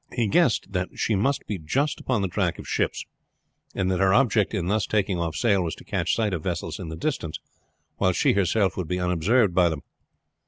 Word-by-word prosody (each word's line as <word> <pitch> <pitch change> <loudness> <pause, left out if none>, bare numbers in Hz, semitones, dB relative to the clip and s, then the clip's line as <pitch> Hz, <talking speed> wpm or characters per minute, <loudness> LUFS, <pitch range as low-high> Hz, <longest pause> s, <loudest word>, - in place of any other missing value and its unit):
He 120 -2 0
guessed 115 - +2
that 90 -1 -1
she 115 - 0
must 125 +8 0
be 100 -4 -4
just 135 - -1
upon 120 -6 -1
the - - +1
track 90 -2 -1
of - - -9
ships, - - -1 0.7
and 95 -1 0
that 90 - 0
her 95 0 +4
object 115 -6 +3
in 95 -5 -1
thus 105 +3 0
taking 100 -4 0
off 85 -2 -2
sail 100 -4 +2
was 85 -2 -3
to - - -14
catch - - -1
sight 110 -4 0
of 85 - -2
vessels - - -3
in 80 - -6
the 80 - -5
distance 85 - -3 0.6
while 95 -1 +2
she - - +2
herself 100 0 +1
would 90 -4 -3
be 90 +3 -2
unobserved 90 +5 +2
by 90 -1 +4
them. 80 -3 -5
95 Hz, 220 wpm, -25 LUFS, 90-110 Hz, 0.7 s, her